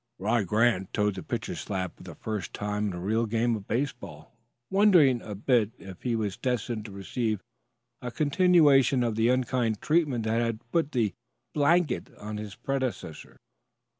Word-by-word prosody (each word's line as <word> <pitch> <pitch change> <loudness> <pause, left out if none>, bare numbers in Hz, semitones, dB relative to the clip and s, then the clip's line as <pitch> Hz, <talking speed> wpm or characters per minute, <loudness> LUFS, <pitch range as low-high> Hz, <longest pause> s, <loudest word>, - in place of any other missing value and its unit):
Rod 105 +1 0
Grant 105 -2 +2
toed 105 -1 +1
the 95 - -6
pitcher's - - -4
slab 95 -3 -4
for - - -18
the - - -10
first 105 -7 -5
time 105 0 -2
in 100 - -3
a 90 - -5
real 110 +5 0
game 115 +2 +1
of 105 -2 -8
baseball, 115 - -4 0.4
wondering 180 - +5
a 105 - -7
bit 110 0 +1
if 95 -3 -11
he 120 -2 -1
was 105 -4 -2
destined 120 -3 -2
to 105 - -8
receive 105 +1 -3 0.6
a 125 - -4
continuation 145 -3 +4
of 115 -2 -1
the 115 +2 +2
unkind 125 -3 +1
treatment 150 -7 +1
that 110 +1 +1
had 115 0 -3
put 165 -3 +1
"the 115 -7 0 0.4
blanket" 150 -1 +2
on 105 +1 -6
his 105 -2 -7
predecessor. 130 - -4
115 Hz, 165 wpm, -28 LUFS, 105-130 Hz, 0.6 s, wondering